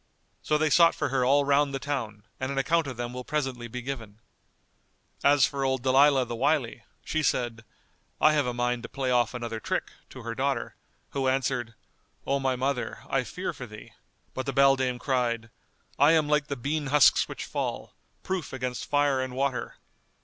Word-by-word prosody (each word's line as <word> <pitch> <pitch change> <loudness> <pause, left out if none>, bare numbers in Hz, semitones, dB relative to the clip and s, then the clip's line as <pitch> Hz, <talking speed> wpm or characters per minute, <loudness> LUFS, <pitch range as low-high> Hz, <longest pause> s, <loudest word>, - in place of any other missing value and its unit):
So 150 - +1
they 155 0 +1
sought 170 +1 +6
for - - -1
her 130 -2 +1
all 140 +3 +4
round 140 0 +2
the - - -2
town; 120 -7 -4 0.2
and 130 +1 -2
an 140 - -4
account 160 +3 +2
of 130 -3 -6
them 120 0 -4
will 125 0 -5
presently 130 -5 -3
be 125 +1 -6
given.[FN#199] 115 +2 -6
As 145 -3 +5
for 140 -1 -3
old 130 -2 0
Dalilah 135 0 +5
the 120 - -4
Wily, 125 -1 0 0.2
she 155 - -1
said, 120 -5 -1 0.6
"I 155 - +5
have 145 -4 +1
a - - 0
mind 120 0 -1
to - - -8
play 130 -2 -2
off 120 0 +2
another 120 -2 -4
trick," - - -2 0.2
to 130 - -10
her 115 0 -4
daughter 130 -1 -2 0.4
who 135 -1 -1
answered, 130 -3 -1 0.5
"O 140 0 +1
my 135 -1 0
mother, 130 0 -2
I - - +2
fear - - -4
for - - -8
thee;" - - -12 0.4
but 130 +1 -4
the 135 - -1
beldam 135 -2 +3
cried, 120 -4 -1 0.5
"I 145 +3 +6
am 155 -2 +3
like 150 0 +1
the 140 - -3
bean 145 +4 -2
husks 145 0 +5
which - - -6
fall, - - -4 0.3
proof 185 -7 -3
against 125 -2 -4
fire 145 -2 +2
and 130 -1 -4
water." 135 -1 -2
130 Hz, 190 wpm, -27 LUFS, 125-140 Hz, 0.6 s, sought